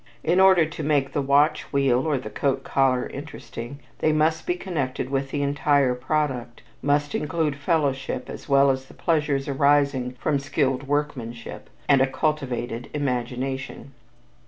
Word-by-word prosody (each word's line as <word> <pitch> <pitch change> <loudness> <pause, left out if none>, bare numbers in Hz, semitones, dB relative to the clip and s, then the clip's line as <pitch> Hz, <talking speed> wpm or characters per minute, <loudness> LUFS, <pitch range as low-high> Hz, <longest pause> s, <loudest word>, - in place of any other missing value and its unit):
In 175 +3 +2
order 190 -3 +6
to 155 0 -7
make 145 -2 +1
the 145 - +1
watch 145 +3 +2
wheel, 135 0 +2
or 150 -3 +1
the 110 -4 -7
coat 135 +5 -1
collar 130 -2 +2
interesting, 140 -3 -8 0.2
they 155 - +2
must 155 +2 +1
be 175 - +1
connected 140 -8 -3
with 135 0 -1
the 145 0 -2
entire 140 -2 +2
product 125 -2 -2 0.2
must 145 0 +1
include 150 -1 -1
fellowship 140 -4 -1
as - - -9
well 140 0 +5
as 130 0 -3
the - - -17
pleasures 150 -5 0
arising 140 -2 +2
from 145 0 +1
skilled 135 -1 -1
workmanship 130 -6 -3 0.2
and 140 -2 +5
a 135 - +4
cultivated 125 -5 -2
imagination. 130 0 -3
140 Hz, 150 wpm, -24 LUFS, 130-150 Hz, 0.2 s, order